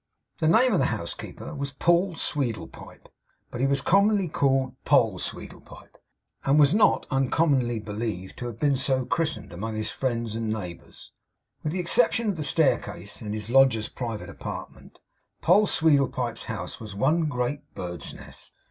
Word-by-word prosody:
The 155 - +2
name 230 +8 +5
of 180 - +3
the - - +3
householder 85 - -5
was 140 0 -4
Paul 175 +5 +2
Sweedlepipe. 130 -8 -4 0.4
But 120 - -4
he 135 - +3
was 140 0 +1
commonly 200 +2 +3
called 135 -4 +1
Poll - - +3
Sweedlepipe; - - -8 0.5
and 140 +2 +3
was 145 +1 +6
not 215 - +4
uncommonly 135 -3 +2
believed 105 -3 -5
to 120 - -4
have 120 - -7
been 145 -3 +2
so 130 -1 +1
christened, 160 - -2
among 110 +5 -4
his 110 0 -2
friends 115 -4 -2
and 115 0 -3
neighbours. 90 -6 -7 0.5
With 150 - -1
the 185 - -2
exception 170 +5 +2
of 200 - -1
the 155 - -3
staircase, 150 0 0
and 105 0 -4
his 110 +2 -5
lodger's 130 -5 +4
private 115 -4 -5
apartment, - - -8 0.5
Poll 210 +1 +5
Sweedlepipe's 135 -6 +1
house - - -5
was 105 -3 -8
one 155 +10 +2
great 140 0 -2
bird's 85 -4 -5
nest. - - -11
135 Hz, 155 wpm, -26 LUFS, 115-160 Hz, 0.5 s, was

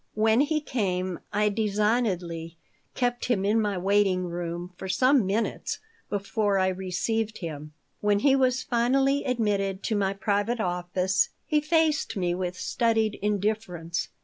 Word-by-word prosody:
When 220 +2 +3
he 305 +1 +1
came 185 - -2
I 210 0 +2
designedly 200 -6 -1 0.4
kept 245 -1 0
him 205 -6 +1
in 220 +2 +3
my 205 -3 -1
waiting 195 0 +2
room 175 +1 -5
for 190 - -7
some 255 +4 +3
minutes 210 +4 -1 0.3
before 205 0 0
I 190 0 +3
received 205 +4 -2
him. 150 -3 -7 0.3
When 205 -1 +2
he 270 +1 +5
was 255 -1 +2
finally 270 +4 +2
admitted 205 -6 0
to 220 - 0
my 195 -1 +1
private 205 +4 0
office 180 0 0 0.2
he 300 -1 +2
faced 305 -6 +1
me 175 -2 0
with 180 0 -3
studied 225 -3 +1
indifference. 195 -6 -1
205 Hz, 140 wpm, -27 LUFS, 185-230 Hz, 0.4 s, he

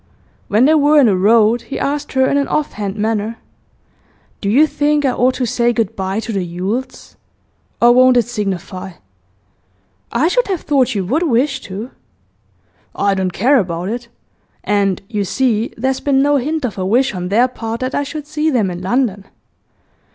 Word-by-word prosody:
When 215 +5 +3
they 305 - +5
were 300 0 +4
in 280 - +6
the 205 -4 +3
road, 220 +4 +3
he - - -7
asked 285 +1 -3
her 265 0 +3
in - - 0
an 280 -1 +1
offhand 210 -10 -2
manner: 220 +1 -2 1.0
'Do 200 - -1
you 275 +9 +5
think 295 -1 0
I 265 - +3
ought 255 +1 +1
to 255 - -1
say 240 0 +1
good 225 -2 -2
bye 190 +2 -2
to 225 - -5
the 195 - 0
Yules? 185 +9 -5 0.6
Or 240 +1 +6
won't 255 0 +5
it 240 - +4
signify?' 190 -4 -5 1.2
'I 275 +7 +2
should - - +1
have 375 -4 -2
thought 270 -6 +1
you 195 -2 -1
would 275 - 0
wish 270 -3 +1
to.' 205 +6 -7 1.0
'I 200 0 +1
don't 190 -1 -1
care 255 +10 +3
about 175 -1 -3
it. 240 +2 -5 0.6
And, 200 -2 0
you 210 -2 -2
see, 225 +2 0
there's 265 +3 -1
been 275 -1 +2
no 290 0 +3
hint 300 +2 -2
of 205 -5 -5
a - - -1
wish 240 +7 +1
on 180 -1 -4
their 235 +5 +3
part 230 -2 -6
that 255 +1 -2
I - - 0
should 285 +1 -6
see 305 +1 -1
them 220 -10 +1
in 175 0 -6
London. 205 -1 -1
235 Hz, 185 wpm, -17 LUFS, 200-270 Hz, 1.2 s, in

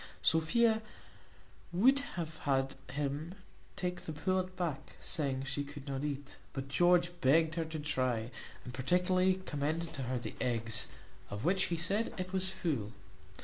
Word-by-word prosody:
Sophia 220 +8 +4 0.9
would 250 +11 +5 0.2
have 160 -2 -4
had 135 -1 +1 0.2
him 145 +5 -2 0.4
take 180 -1 -2
the 165 - -5
pullet 185 +3 0
back, 165 -7 -3
saying, 135 -5 -1
she 140 +1 -2
could 145 0 -9
not 135 0 -2
eat; 145 -1 -4 0.2
but 135 0 -4
George 175 +3 +4
begged 160 +4 +5
her 165 0 0
to 160 0 -5
try, 130 -6 0 0.3
and 125 - -6
particularly 180 +7 +3
recommended 160 -1 -2
to 140 - -4
her 130 0 -1
the 120 - -4
eggs, 115 -2 +1 0.4
of 100 +1 -4
which 185 +2 +3
he 170 - -1
said 195 +7 0
it 185 0 -3
was 190 0 +3
full. 130 - -2
155 Hz, 150 wpm, -34 LUFS, 135-180 Hz, 0.9 s, would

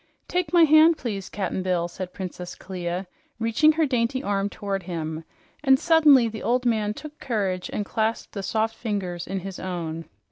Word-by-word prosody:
"Take 360 -3 -1
my 345 -2 +6
hand, 315 +1 +6
please, 200 -8 -4
Cap'n 190 -2 -2
Bill," 180 -2 0
said 180 +1 -7
Princess 180 -1 -7
Clia, 180 0 -4 0.3
reaching 230 +7 +3
her 320 0 +2
dainty 255 -1 0
arm 200 0 0
toward 200 -1 -3
him; 165 -3 -4 0.4
and 265 -2 +6
suddenly 300 -6 +5
the 220 -1 -6
old 250 +1 +1
man 215 -3 +1
took 305 +3 -10
courage 195 -7 -2
and 205 - -2
clasped 220 +2 -2
the 200 - -4
soft 220 +3 0
fingers 190 -7 -3
in 195 -1 -3
his 190 0 -7
own. 165 -3 -4
205 Hz, 175 wpm, -25 LUFS, 185-255 Hz, 0.4 s, my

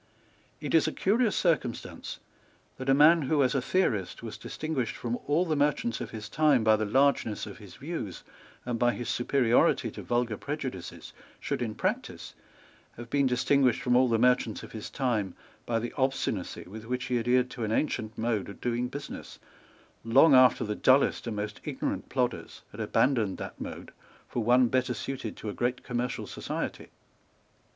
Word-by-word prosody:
It 150 - -4
is 160 -1 +5
a - - 0
curious 215 +5 +1
circumstance 155 -9 -1 0.6
that 130 +1 -4
a - - +6
man 160 +4 +6
who, 145 +1 +2
as 125 - +2
a 135 - +1
theorist, 115 - 0
was 115 - -6
distinguished 135 -4 -3
from 120 0 -3
all 160 +5 +2
the 160 -3 0
merchants 145 -5 0
of - - -5
his 110 -1 -7
time 150 -6 +3
by 110 0 +5
the 110 0 -1
largeness 130 -2 +2
of - - -10
his - - -12
views - - -6 0.4
and 120 -2 -2
by 120 0 +3
his 120 - -5
superiority 120 -1 +2
to - - -8
vulgar 120 -3 -1
prejudices, 130 - -6 0.3
should, - - -3
in 110 -3 -2
practice, - - -3 0.6
have 120 0 -9
been 140 -1 +3
distinguished 125 0 +2
from 125 -1 +2
all 125 0 +5
the 115 - +3
merchants 125 -2 +2
of - - -10
his 110 -2 -7
time 115 -8 -1 0.3
by 115 - +1
the 120 +1 -3
obstinacy 130 - -1
with 110 +6 -10
which 125 +1 -2
he 125 -2 0
adhered 125 +2 +2
to 120 - -5
an 110 - -1
ancient 110 -4 -1
mode 110 -3 -1
of 100 - -10
doing 120 0 -1
business, 140 +3 -8 0.7
long 135 +7 +6
after 130 -1 +6
the 105 - -2
dullest 130 +3 +3
and 115 - -3
most 105 0 -5
ignorant 145 -3 -3
plodders 125 -2 -2
had - - -11
abandoned 115 -8 +1
that - - -8
mode - - -7 0.4
for 120 - -2
one 125 +2 +5
better 130 0 0
suited 125 -1 -5
to - - -7
a 105 - -3
great 125 +1 -1
commercial 125 0 -3
society. - - -5
125 Hz, 175 wpm, -28 LUFS, 115-135 Hz, 0.7 s, a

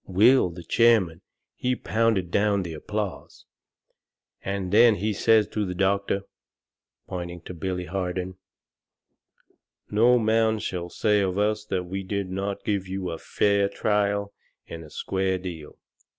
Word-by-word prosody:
Will, 105 +4 +5
the 85 0 -10
chairman, 105 -8 +3 0.3
he 125 0 -1
pounded 110 -7 0
down 100 0 +2
the 85 -2 -6
applause, 105 +4 -5 1.0
and 100 -2 -3
then 115 0 +7
he 105 +3 -1
says 110 +1 +4
to 105 - -2
the 90 -2 -4
doctor, 100 +1 0 0.8
pointing 85 -1 -6
to 90 - -8
Billy 90 +1 -3
Harden: 90 0 -4 1.5
"No 120 +4 +5
man 110 -1 +2
shall 90 -4 -4
say 105 +3 +2
of 95 -1 -1
us 105 +1 0
that 95 -3 -2
we 95 +2 -4
did 95 -1 -3
not 100 +1 -4
give 100 -3 -1
you 95 -1 -4
a 80 - -6
fair 100 -1 +1
trial 100 -1 0 0.3
and 80 0 -8
a 75 - -13
square 95 +3 -1
deal. 85 -5 -8
100 Hz, 140 wpm, -25 LUFS, 90-105 Hz, 1.5 s, then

